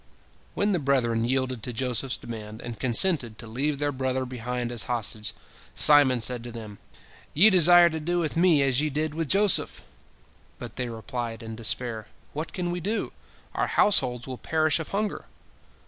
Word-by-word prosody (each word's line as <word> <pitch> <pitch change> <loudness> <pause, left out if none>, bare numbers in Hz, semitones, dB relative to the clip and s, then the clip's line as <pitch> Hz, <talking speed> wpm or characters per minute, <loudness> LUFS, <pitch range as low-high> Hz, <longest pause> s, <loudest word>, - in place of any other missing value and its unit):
When 205 +1 +1
the 180 - +1
brethren 120 -5 0
yielded 130 -1 -1
to 125 - -4
Joseph's 125 +1 -2
demand, 110 -1 -9
and 120 -2 -7
consented 125 - +1
to 115 - -8
leave 140 +6 -2
their 145 +1 -1
brother 130 -1 -2
behind 125 -1 -4
as 120 -4 -1
hostage, 110 -2 -3 0.4
Simon 140 -5 +5
said 120 0 +1
to 120 - -7
them, 110 -3 -10 0.6
"Ye 200 +8 +7
desire 175 -1 +7
to 160 - -4
do 175 +3 -1
with 160 -4 -1
me 165 -4 +4
as 135 0 +2
ye 155 - -1
did 150 +1 -2
with 165 0 -3
Joseph!" 200 -1 +2 0.7
But 120 -2 -9
they 125 -2 -3
replied, 115 0 -6
in 110 0 -7
despair: 115 0 -2 0.3
"What 155 +3 -5
can 175 -2 -3
we 175 - -3
do? 205 +6 -3 0.4
Our - - -1
households 125 - +2
will 130 -2 -8
perish 155 0 +1
of 160 - -5
hunger." 210 +1 -3
130 Hz, 175 wpm, -25 LUFS, 120-155 Hz, 0.7 s, Ye